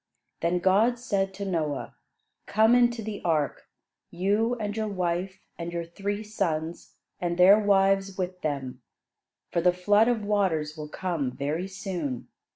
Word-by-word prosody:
Then 170 +2 +1
God 200 +7 +3
said 200 -5 -1
to 200 - -5
Noah: 155 -6 -2 0.5
"Come 220 +3 +4
into 240 -2 +3
the 210 -1 -5
ark, 155 -4 0 0.4
you 205 +7 +1
and 210 -3 -4
your 220 -1 -1
wife, 185 0 -2 0.2
and 170 0 -4
your 170 -1 -3
three 200 +5 -4
sons, 170 -6 -3 0.2
and 175 -1 -2
their 190 +4 +8
wives 195 -1 +2
with 180 -1 -3
them; 140 -4 -3 0.7
for 170 - +1
the 180 +1 +5
flood 205 +5 +3
of 230 -4 0
waters 175 -7 0
will 150 -2 -7
come 165 -6 -2
very 150 +8 -3
soon. 180 -9 -4
190 Hz, 150 wpm, -27 LUFS, 170-205 Hz, 0.7 s, their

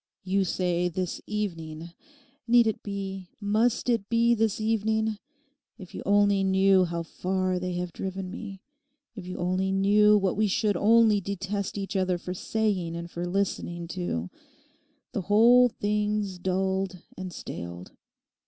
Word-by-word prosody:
You 195 +1 +1
say 180 -1 0
"this 180 +1 -3
evening"; 170 -6 -4 0.6
need 240 0 +6
it 220 - -1
be, 195 -2 -5
must 220 +4 +1
it 230 -5 0
be 235 0 +4
this 220 -2 +1
evening? 220 0 0 0.6
If 185 -3 -12
you - - -6
only 200 -1 +4
knew 190 0 +4
how 170 -1 -3
far 185 +2 -1
they 180 0 -3
have 175 -1 -4
driven 190 -1 -5
me. 200 -3 -8 0.5
If 190 -5 -8
you 180 - -5
only 185 +2 0
knew 210 +2 +5
what 195 -2 0
we 215 +1 +2
should 205 +1 +1
only 215 +1 +4
detest 200 +1 -3
each 195 0 -4
other 185 -2 +1
for 180 +1 -6
saying 185 -4 -1
and 170 0 -6
for 175 +1 -4
listening 175 -2 -2
to. 160 - -3 0.8
The - - -2
whole 235 +6 +6
thing's 210 -3 -1
dulled 190 0 -1
and 185 -1 -6
staled. 85 - -8
195 Hz, 145 wpm, -27 LUFS, 180-210 Hz, 0.8 s, need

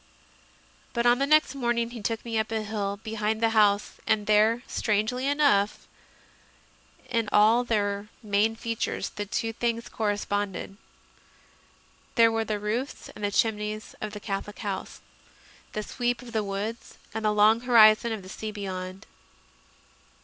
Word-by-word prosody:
But 235 0 0
on 240 +1 +5
the 275 - +1
next 305 -2 +4
morning 240 -3 -1
he 235 -2 -7
took 225 +3 -3
me 225 -1 -1
up 220 +1 -2
a 220 -1 -1
hill 200 -2 -3
behind 220 0 -1
the 225 0 +2
house, 210 -2 +3
and 215 -1 +2
there, 215 +3 +3
strangely 220 +5 0
enough, 280 -9 +2 1.2
in 230 -4 -1
all 220 +4 +5
their 205 -3 -1 0.2
main 210 +2 +2
features 230 0 -3
the 205 0 -6
two 225 +3 -2
things 235 0 -2
corresponded. 205 -2 -2 1.4
There 230 -1 +6
were 225 0 0
the 215 -1 -1
roofs 220 +7 -3
and 205 -1 -4
chimneys 215 0 -1
of 215 -1 -4
the 210 - -6
Catholic 205 0 -5
house, 200 -3 -5 0.7
the 215 - -3
sweep 245 +2 -2
of 240 - -10
the 220 -2 0
woods, 205 +3 -5 0.2
and 220 0 -4
the 215 - +3
long 210 +2 +5
horizon 230 -2 +6
of 215 -3 -4
the - - -11
sea 215 +2 -5
beyond. 190 -2 -6
215 Hz, 150 wpm, -27 LUFS, 205-230 Hz, 1.4 s, There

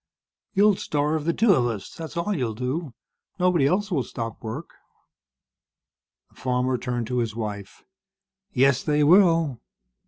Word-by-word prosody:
"You'll 205 0 +5
starve 150 +1 -1
the 170 - +2
two 225 +1 +4
of 125 -7 +2
us, 110 -5 -5
that's 165 +1 -8
all 175 +5 0
you'll 120 -8 -2
do. 130 +4 -3 0.4
Nobody 180 -6 +3
else 205 +5 0
will 150 -7 +1
stop 115 -2 -6
work." 120 +9 -6 1.6
The - - -27
farmer 125 0 0
turned 120 -1 -3
to 125 +2 -1
his 115 -2 -2
wife. 105 -3 -6 0.7
"Yes, 135 -1 +3
they 150 0 +1
will. 165 - +4
140 Hz, 145 wpm, -24 LUFS, 120-170 Hz, 1.6 s, You'll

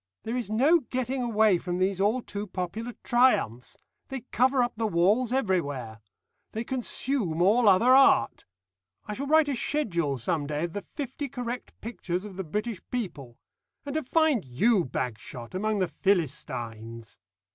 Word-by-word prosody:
There 225 +2 -3
is 245 -5 -2
no 275 +11 +4
getting 255 -1 -3
away 215 -5 +3
from 175 0 -3
these 190 +1 0
all 220 +5 +2
too 205 +1 -5
popular 200 +6 -4
triumphs. 240 - +2 0.3
They 265 -2 -5
cover 255 +1 +3
up 240 - -2
the 220 0 -1
walls 210 +7 +2
everywhere. 145 - -1 0.5
They 225 - -2
consume 245 - -1
all 210 +5 +5
other 220 +7 +5
art. 270 0 +4 0.6
I 210 - -4
shall 275 +6 -4
write 315 0 +5
a 280 - 0
schedule 170 - -1
some 145 +3 -1
day 150 +1 -2
of 170 -1 -3
the 205 - -3
Fifty 275 - -6
Correct 245 -1 -6
Pictures 195 -5 -4
of 200 -3 -9
the 190 - -4
British 210 +4 -3
People. 150 - -5 0.5
And 285 - -4
to 315 - 0
find 315 -3 +2
you, 180 - +2
Bagshot, 120 -1 -5
among 215 +3 0
the 185 -2 +1
Philistines!" 120 - -3
210 Hz, 155 wpm, -27 LUFS, 170-250 Hz, 0.6 s, all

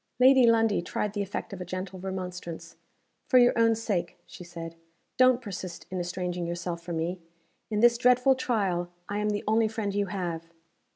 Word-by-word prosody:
Lady 260 -1 +7
Lundie 225 -4 +3
tried 205 +4 -3
the 205 - -2
effect 200 +1 -5
of 185 - -7
a - - -2
gentle 185 +1 -6
remonstrance. 180 -3 -6 0.5
"For 255 - +5
your 245 0 +6
own 230 -1 +4
sake," 195 -6 -2
she - - -11
said, 170 -1 -8 0.4
"don't 255 -1 +5
persist 185 -4 -7
in 185 - -2
estranging 175 0 -3
yourself 170 0 -4
from 170 -1 -4
me. 175 +3 -2 0.5
In 210 -1 0
this 235 0 +5
dreadful 250 +2 +5
trial, 200 -9 -1 0.2
I 205 +1 -2
am 210 0 0
the 205 0 -2
only 220 +1 +3
friend 215 -2 -3
you 200 0 0
have." 175 -4 -4
195 Hz, 180 wpm, -28 LUFS, 175-225 Hz, 0.5 s, Lady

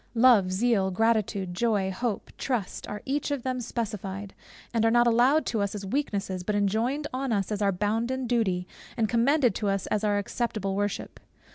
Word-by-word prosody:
Love, 225 -6 +5
Zeal, 195 -1 +2
Gratitude, 205 -2 0
Joy, 200 -1 +1
Hope, 220 +2 -3
Trust, 240 -8 -2
are 210 0 -6
each 280 +2 -1
of 285 -4 -2
them 255 -1 -2
specified; 205 -4 -4 0.4
and 230 -1 +2
are 225 - +5
not 240 +1 +4
allowed 245 +6 +4
to 220 -3 -1
us 200 +1 -1
as 200 -1 -5
weaknesses, 200 -6 -2
but 205 +3 -2
enjoined 225 +9 0
on 265 0 -2
us 200 -2 0
as 210 0 -2
our 200 -1 +3
bounden 225 +7 -1
duty, 200 -7 0 0.3
and 225 -2 +2
commended 245 +2 +3
to 205 +1 -1
us 195 -1 -1
as 210 0 0
our 205 -1 +2
acceptable 205 -2 -2
worship. 205 0 -3
220 Hz, 180 wpm, -27 LUFS, 195-240 Hz, 0.4 s, Love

